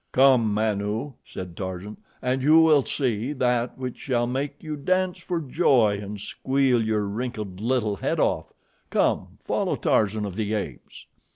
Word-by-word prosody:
"Come, 130 -5 +5
Manu," 105 +4 -1
said 90 -2 -8
Tarzan, 95 +3 -6 0.3
"and 130 +1 0
you 155 +4 +6
will 155 -3 +6
see 125 -1 -1
that 125 -3 0
which 130 -2 -5
shall 120 -3 0
make 135 +5 -3
you 155 -1 -4
dance 185 +5 0
for 175 -2 -2
joy 125 - +3
and 105 0 -6
squeal 130 +3 +1
your 110 -1 0
wrinkled 105 -3 -4
little 115 -4 0
head - - -1
off. - - 0 0.4
Come, - - 0
follow - - 0
Tarzan 105 0 +1
of 95 -3 -5
the 110 0 -1
Apes." 105 - -6
120 Hz, 155 wpm, -25 LUFS, 105-135 Hz, 0.4 s, you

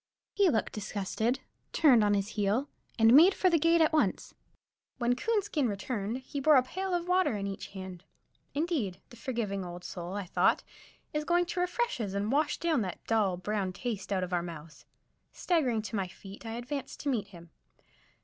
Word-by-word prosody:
He 400 -3 +4
looked 220 -7 0
disgusted, 215 +4 -2 0.3
turned 255 -9 +6
on 205 0 +3
his 200 0 -1
heel, 215 +6 0 0.3
and 225 0 +6
made 340 +8 +8
for 370 - +3
the 335 - +4
gate 330 +2 +4
at 315 0 +3
once. 310 - +1 0.6
When 245 -1 +1
Coonskin 340 - 0
returned, 215 +3 -3
he 285 - -4
bore 300 +2 +5
a 255 - +6
pail 375 +7 -3
of 350 0 -2
water 365 -9 +2
in 200 - -3
each 195 -1 -5
hand. 185 -2 -8 0.5
Indeed, 285 - -1
the - - -11
forgiving 230 -6 -3
old 175 0 -8
soul, 175 0 -6
I 200 -1 -3
thought, - - +2 0.5
is 300 0 -1
going 350 +2 +2
to 355 - -4
refresh 360 - 0
us 200 -2 -3
and 205 +3 -1
wash 290 +2 +1
that 285 - -1
dull, 205 -5 +1
brown 195 0 -2
taste 205 -2 -4
out 190 -2 +1
of 180 0 -4
our 175 - +2
mouths. 165 -3 -9 0.5
Staggering 260 -11 +1
to 220 - -5
my 195 -2 -1
feet, 195 +4 -11
I 225 - -4
advanced 250 +4 -5
to 290 - -1
meet 220 -6 -1
him. 170 -4 -14
225 Hz, 190 wpm, -30 LUFS, 195-300 Hz, 0.6 s, made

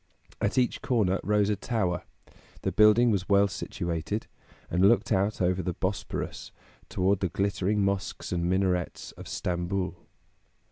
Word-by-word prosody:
At 100 - 0
each 125 -2 +1
corner 100 -6 +1
rose 105 0 +2
a - - +1
tower; 100 -4 -1 0.6
the - - 0
building 110 +3 +5
was 95 -2 -1
well 100 0 +5
situated, 85 +1 -3 0.5
and 90 +3 +4
looked 115 0 +2
out 100 +1 +1
over 90 +1 +1
the 90 -1 -3
Bosporus 95 +1 -4 0.4
toward 95 +1 +1
the 95 - 0
glittering 100 +1 0
mosques 100 -1 -2
and 85 -1 0
minarets 90 -2 0
of - - -11
Stamboul. 90 0 -3
95 Hz, 140 wpm, -28 LUFS, 90-105 Hz, 0.6 s, building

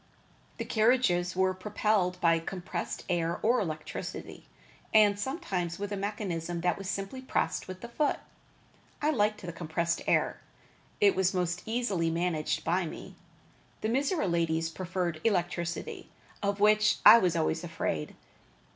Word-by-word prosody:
The - - -4
carriages 215 -6 +2
were 190 0 +2
propelled 185 -1 0
by 165 -2 +4
compressed 175 +1 -5
air 170 -1 0
or 240 +3 +4
electricity; 155 -6 -5 0.5
and 205 -2 +6
sometimes 200 - -3
with 205 +1 -4
a - - -1
mechanism 180 -4 -3
that 175 0 +2
was 195 -1 -6
simply 195 +8 -4
pressed 260 - -1
with 185 0 -8
the 235 - -6
foot. 290 +5 0 0.8
I 300 +1 +2
liked 210 -5 +1
the 175 -2 -5
compressed 170 0 -1
air - - +2
best. - - -27 0.6
It 200 -1 +5
was 190 0 +1
most 180 -1 -1
easily 220 -8 0
managed 165 -2 -1
by 175 +1 +1
me. - - -9 0.7
The 215 - -1
Mizora 275 - +1
ladies 165 -2 0
preferred 175 -2 -3
electricity, 175 -4 -2 0.3
of 200 0 -1
which 215 +1 +4
I 235 - +11
was 180 -5 +1
always 160 +1 0
afraid. 165 - -3
185 Hz, 145 wpm, -29 LUFS, 170-210 Hz, 0.8 s, I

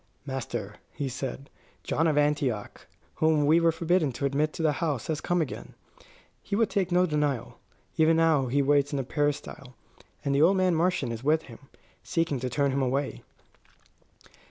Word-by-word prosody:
"Master," 135 -4 -5 0.2
he 140 -1 -3
said, 135 +1 -6 0.3
"John 165 +2 +1
of 150 -2 +1
Antioch, 145 -7 -1 0.3
whom 155 -2 +3
we 160 +3 +5
were 165 -1 +4
forbidden 165 -2 +1
to 140 - -3
admit 145 +3 +1
to 165 - -4
the 155 - +4
house, 145 -8 -1
has 155 -1 -2
come 175 -1 +1
again. 145 - -8 0.7
He - - -3
would 225 +1 +1
take 190 -3 0
no 180 +1 +4
denial. 150 -6 -2 0.4
Even 160 +1 +4
now 160 -5 +3
he 140 +3 +1
waits 145 0 +2
in 145 - -1
the 135 - -1
peristyle; 140 -2 -3 0.5
and 140 - +1
the 140 - +3
old 185 +5 +5
man 185 -1 +3
Marcion 165 -6 +1
is 115 +1 -6
with 155 +3 +2
him, 115 -3 -12 0.4
seeking 165 -6 -1
to 130 +1 -3
turn 140 +2 +1
him 135 +1 0
away." 135 +2 -1
145 Hz, 180 wpm, -27 LUFS, 135-165 Hz, 0.7 s, we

